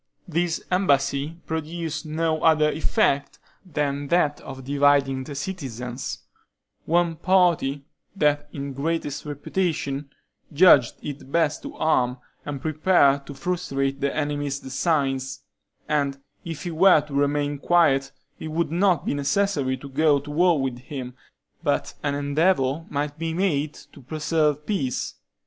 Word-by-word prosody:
This 170 0 0
embassy 145 -3 +1
produced 160 -1 -4
no 155 0 0
other 155 -1 +4
effect 145 -3 +1 0.3
than 145 -5 -2
that 150 -2 +2
of 130 0 -9
dividing 140 -1 +2
the 145 - -7
citizens; 130 -6 -5 0.6
one 170 0 +2
party, 170 -7 +2 0.3
that 145 -4 +1
in 140 -1 -5
greatest 150 +1 -2
reputation, 145 -2 -2 0.4
judged 145 -6 +6
it 140 -2 -7
best 160 -2 +1
to - - -8
arm, 125 -5 +1 0.3
and 145 -2 -3
prepare 155 -3 +3
to 140 - -8
frustrate 140 -6 -2
the 140 0 +1
enemy's 145 -2 -1
designs; 135 -1 -1 0.4
and 140 -2 0 0.3
if 165 -3 -6
he 175 - -3
were 170 -1 +6
to 150 -1 -11
remain 145 0 0
quiet, 140 -5 +3 0.3
it - - -5
would 155 0 -1
not 175 -3 +2
be - - 0
necessary 145 -2 0
to 140 - -10
go 145 +2 +3
to 145 +2 -9
war 170 +1 +3
with 130 -2 -2
him, 125 -1 -7 0.5
but - - 0
an 145 -1 -1
endeavor 145 0 +1
might 145 +1 -3
be 165 0 -2
made 155 -6 0
to - - -15
preserve 150 +1 0
peace. 140 - -2
145 Hz, 135 wpm, -24 LUFS, 140-165 Hz, 0.6 s, judged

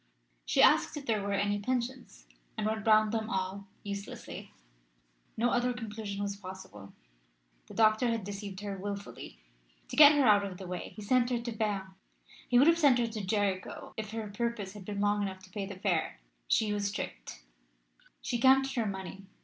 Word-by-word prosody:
She - - +4
asked - - +4
if 285 - -7
there 220 -4 +1
were 200 0 -2
any 205 +1 +1
pensions, 240 - -3 0.3
and - - -1
went 220 0 -2
round 215 -1 +5
them 220 -1 -2
all 190 0 -3 0.2
uselessly. 200 -1 -7 0.9
No 235 +2 +2
other 245 +1 +1
conclusion 210 -4 -5
was 200 0 -2
possible. 185 - -10 0.7
The - - -11
doctor 220 +2 +4
had 230 -3 -1
deceived 200 0 -6
her 200 -2 -5
wilfully. 200 - -6 0.5
To - - -5
get 295 0 +10
her 290 -2 +3
out 205 -2 +6
of 190 -2 -5
the 190 - -8
way 180 0 -5
he 210 - -8
sent 245 +3 +3
her 245 -2 0
to 235 0 -4
Berne. 205 -4 -2 0.6
He 245 - +4
would 265 - +7
have 335 0 +5
sent 280 -6 +5
her 240 - +2
to 220 -2 -5
Jericho 195 -1 -2
if 215 -1 -5
her 220 0 -4
purse 205 -2 -3
had 205 -3 -10
been 200 0 -3
long 205 0 +2
enough 190 -2 -4
to 185 - -16
pay 195 0 -4
the 200 - -7
fare. 185 - -1 0.3
She 215 -2 +2
was 200 -1 -1
tricked. - - -6 0.8
She 240 - -1
counted 270 +1 +5
her 230 -3 0
money. 195 0 -6
205 Hz, 190 wpm, -31 LUFS, 195-230 Hz, 0.9 s, get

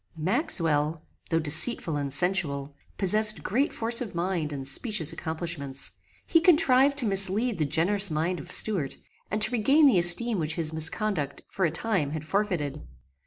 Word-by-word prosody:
Maxwell, 160 - -1 0.2
though 165 - 0
deceitful 160 +3 +1
and 140 -1 -4
sensual, 145 -4 -2 0.2
possessed 215 +2 +4
great 265 +9 -1
force 230 +1 +1
of 220 -8 -7
mind 170 -3 -3
and 135 -2 -7
specious 170 - +1
accomplishments. 160 -5 -5 0.3
He 330 - +2
contrived 285 -5 +3
to 265 - -2
mislead 200 +2 +2
the 155 - +1
generous 195 +7 +1
mind 165 +3 -3
of 145 - -11
Stuart, 180 -11 0 0.3
and 215 - -3
to - - +2
regain 270 +6 +2
the 250 -10 +4
esteem 185 +5 +5
which 155 -1 -3
his 160 -2 -1
misconduct, 160 -1 -2
for 190 - -2
a - - 0
time, 165 -5 -2
had 155 -1 -7
forfeited. 160 -6 -3
175 Hz, 160 wpm, -25 LUFS, 155-215 Hz, 0.3 s, esteem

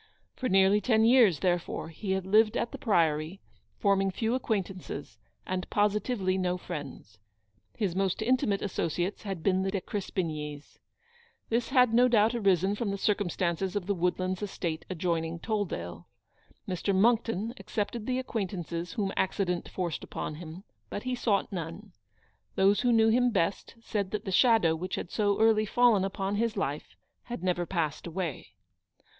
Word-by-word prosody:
For 255 - -2
nearly 195 +1 +4
ten 220 -2 +3
years, 230 - +5
therefore, 175 -3 -1
he 190 +4 -3
had 190 -1 -2
lived 215 +3 +4
at 235 - -1
the - - -7
Priory, 165 -4 +1 0.4
forming 195 -1 +2
few 220 +4 -1
acquaintances, 190 - -3 0.3
and 185 -1 -3
positively 205 -2 +1
no 180 -1 0
friends. 145 -11 -8 0.6
His 195 -6 -1
most 195 +2 0
intimate 220 -4 +1
asso 195 -4 -1
ciates 175 +5 -2
had 195 -6 -5
been 190 0 +2
the 195 - 0
De 195 0 -1
Crespignys. 155 -7 -4 0.7
This 230 +1 0
had 250 -4 +4
no 245 +2 +6
doubt 225 -1 +4
arisen 195 -4 +2
from 205 0 -2
the 200 - -2
circumstance 185 -4 0
of 200 -3 -1
the 200 - +1
Wood 180 -1 0
lands 185 +1 -2
estate 170 -5 -3
adjoining 170 -2 -1
Tolldale. 165 - -3 0.6
Mr. 185 +2 -1
Monckton 225 +1 +2
accepted 215 +1 -3
the 255 -1 0
acquaintances 180 -8 -4
whom 195 -3 -1
accident 180 -2 -1
forced 175 -4 -3
upon - - -5
him, 165 +3 -9 0.3
but 205 - -5
he 255 0 -2
sought 220 -5 0
none. 180 +3 -6 0.6
Those 195 +2 +4
who 245 - +3
knew 225 -1 +5
him 245 +2 +4
best 195 -4 -1
said 205 -4 -2
that 210 - -4
the 190 - -3
shadow 190 -5 +4
which 180 +3 -4
had - - -6
so 205 -2 +1
early 220 -1 +4
fallen 235 -3 +4
upon 195 +1 -2
his 230 -1 0
life 145 -6 -3 0.3
had 240 -7 -6
never 175 -2 0
passed 160 -4 -2
away. 170 -4 -5
195 Hz, 160 wpm, -29 LUFS, 175-220 Hz, 0.7 s, no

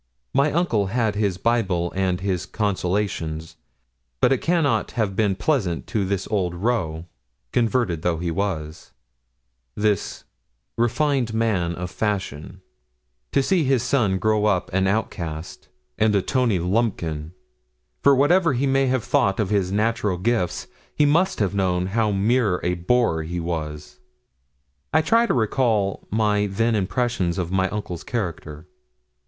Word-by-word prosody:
My 140 +3 +3
uncle 130 - +1
had 110 0 0
his 100 -3 0
Bible 95 -6 0
and 95 -1 0
his 95 -4 -2
consolations; 90 -6 -2 0.6
but 125 - +4
it 130 - 0
cannot 155 -10 +1
have 105 -4 -1
been 105 -2 +1
pleasant 100 - 0
to 105 -3 0
this 95 0 -2
old 90 -5 0
roué, 85 -6 -1 0.5
converted 115 -8 +1
though 85 -1 0
he 85 0 -2
was 80 -4 -4 0.8
this 105 -2 -1 0.5
refined 120 -1 +1
man 95 -7 0
of 90 +1 -5
fashion 95 -4 -3 0.7
to 135 - +2
see 180 +2 +2
his 130 -3 +2
son 120 -7 +1
grow 110 +1 +1
up 100 -5 0
an 95 0 +2
outcast, 85 -6 -3 0.3
and 110 -1 +3
a 100 - +2
Tony 125 -7 +1
Lumpkin; 85 -5 -1 0.7
for 140 -1 +6
whatever 165 +4 +3
he 130 +3 0
may 135 0 +2
have 130 -3 0
thought 100 +1 +1
of 105 -2 0
his 95 -3 +1
natural 105 -2 0
gifts, 95 -2 -1 0.3
he 150 - +3
must 170 +6 +2
have 100 -3 0
known 90 -2 +1
how 105 +3 +1
mere 105 -1 +2
a 90 - +1
boor 90 -1 +1
he 85 +3 -4
was. 75 -3 -5 0.9
I 160 - +3
try 230 +8 +3
to - - +1
recall 110 -4 0
my 105 -1 +1
then 115 +4 0
impressions 105 -3 0
of 90 -2 -2
my 95 0 +1
uncle's 95 -5 -5
character. 85 - -4
100 Hz, 145 wpm, -23 LUFS, 90-120 Hz, 0.9 s, for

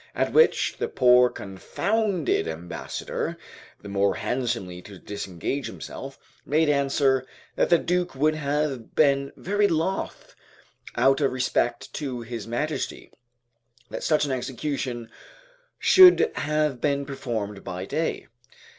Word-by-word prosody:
At - - 0
which 470 - +4
the - - 0
poor 125 -1 +5
confounded 180 - -1
ambassador, 80 +2 -5 0.5
the - - -8
more 100 0 +1
handsomely 115 -8 -3
to 100 +1 -12
disengage 100 +8 -4
himself, - - -8 0.3
made 155 +2 +2
answer, 140 -2 +2 0.3
that - - +1
the 170 - +6
Duke 180 -1 -1
would 155 +3 +2
have 145 -4 -2
been 140 -2 +3
very 205 +2 +1
loth, 170 +2 -2 0.6
out 135 +2 +3
of 140 - +2
respect 130 0 -1
to 130 -5 -4
his 115 -2 -6
Majesty, 145 +7 -3 0.8
that - - -5
such 155 -1 +2
an 140 - -3
execution 130 -2 -3 0.7
should 370 -1 +7
have 150 -3 -1
been 140 -1 0
performed 115 -7 -4
by 90 +1 -5
day. 160 +10 -2
135 Hz, 120 wpm, -25 LUFS, 120-155 Hz, 0.8 s, should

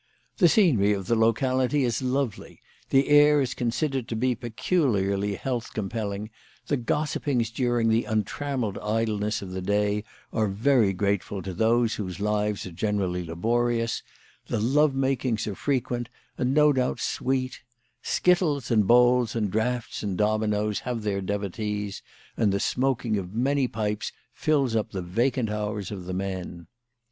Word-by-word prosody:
The 180 - +6
scenery 130 - +4
of 95 -2 -3
the 115 - +1
locality 130 +5 +2
is 120 -1 0
lovely; 130 -3 -2 0.3
the 135 +1 +3
air 145 0 +6
is 135 -3 0
con 120 -2 -1
sidered 130 +1 -1
to 115 - -3
be 125 +3 +1
peculiarly 105 - 0
health 120 +1 -4
compelling; 105 0 -3 0.3
the 145 - 0
gos 145 +5 -1
sipings 120 -6 -1
during 120 -2 +1
the 115 +1 +2
untrammelled 110 +1 -2
idleness 105 -1 -1
of 95 - -8
the 95 0 -4
day 105 +2 0 0.3
are 110 -2 +1
very 110 +1 +3
grateful 100 0 -1
to 95 - -5
those 115 +4 +2
whose 95 -4 -5
lives 105 0 0
are 90 - -7
generally 95 -1 -1
laborious; 115 +7 0 0.5
the - - -1
love 135 +5 +3
makings 130 -4 0
are 105 - -3
frequent, 120 0 -2 0.3
and 125 +1 0
no 150 +1 +5
doubt 130 -1 0
sweet; 130 0 -2 0.4
skittles 165 -8 +1
and 105 -4 +3
bowls 125 0 +4
and 105 -4 0
draughts 120 +3 -1
and 100 -4 -3
dominoes 105 0 +1
have 120 -3 -4
their 100 -2 -1
devotees; 105 +1 -3 0.3
and 105 -3 +2
the 100 - 0
smoking 125 -4 0
of 95 +2 -8
many 135 +2 +2
pipes 105 -2 -2 0.2
fills 140 -6 +1
up 110 - 0
the 95 - -2
vacant 115 +5 0
hours 105 -2 -3
of 95 -3 -6
the 90 - -4
men. 90 -3 -4
115 Hz, 155 wpm, -26 LUFS, 105-130 Hz, 0.5 s, The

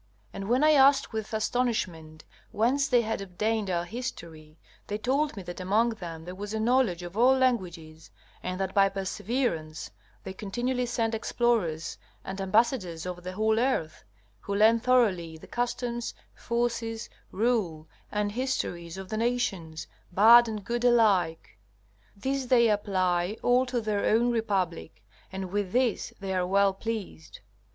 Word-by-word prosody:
And 195 +1 -6
when 255 +4 +3
I 310 - +6
asked 275 -3 +5
with 220 -1 -4
astonishment 205 -9 -2 0.3
whence 260 +6 +1
they 245 -1 +3
had 220 -2 -3
obtained 210 +2 -2
our 175 -1 -1
history, 170 -9 -7 0.3
they 205 - -2
told 270 +4 0
me 195 - -6
that 175 +1 -8
among 210 +6 +2
them 170 -7 -8
there 180 - -7
was 205 +3 -6
a - - -1
knowledge 225 -6 +2
of 175 +1 -8
all 255 +4 +5
languages, 170 -11 -2 0.3
and 185 +1 -4
that 190 -1 -2
by 195 -1 +4
perseverance 190 -4 -3 0.3
they 190 - -6
continually 245 +6 -2
send 230 -1 -1
explorers 220 -8 -1 0.3
and 195 +1 -5
ambassadors 190 -5 +1
over 180 -1 -5
the 185 +1 -6
whole 220 +2 +1
earth, 235 -11 -1 0.4
who 200 - -4
learn 220 +3 +5
thoroughly 210 -10 +2
the - - -13
customs, 240 0 -3 0.2
forces, 235 -1 -2 0.2
rule 195 -8 0 0.2
and 210 -1 -1
histories 190 -8 -3
of 190 -1 -8
the 215 - -3
nations, 215 -9 -2 0.3
bad 230 +6 +7
and 215 -3 -5
good 240 +1 -2
alike. 200 - +2 0.6
These 265 +5 -2
they 235 -2 +5
apply 185 -2 0
all 250 +1 +3
to 245 -1 -1
their 215 -2 -1
own 235 +3 +3
republic, 195 -8 -2 0.3
and 190 -1 -5
with 200 -2 -2
this 250 -3 +1
they 195 -1 -4
are 180 -1 0
well 195 +1 +3
pleased. 205 -5 -6
210 Hz, 150 wpm, -28 LUFS, 180-240 Hz, 0.6 s, bad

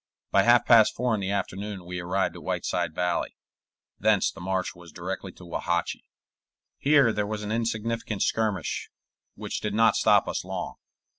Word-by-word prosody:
By 100 - +5
half 120 +3 +5
past 115 -3 +6
four 125 -1 0
in 105 - -1
the 95 - -2
afternoon 100 -1 -3
we 90 0 -5
arrived 90 +2 -1
at - - -9
Whiteside - - -2
Valley; 90 -1 -1 0.6
thence 105 -1 +3
the 95 - -12
march 95 0 -1
was 85 -1 -14
directly 95 +2 -5
to 90 - -14
Wauhatchie. 85 0 -2 0.7
Here 140 -5 +4
there 105 -1 -1
was 105 0 -4
an 105 - -4
insignificant 115 -1 -1
skirmish, 105 -7 -1 0.5
which - - -4
did 105 -1 -2
not 115 0 +5
stop - - +4
us - - -2
long. - - -5
100 Hz, 165 wpm, -26 LUFS, 90-110 Hz, 0.7 s, past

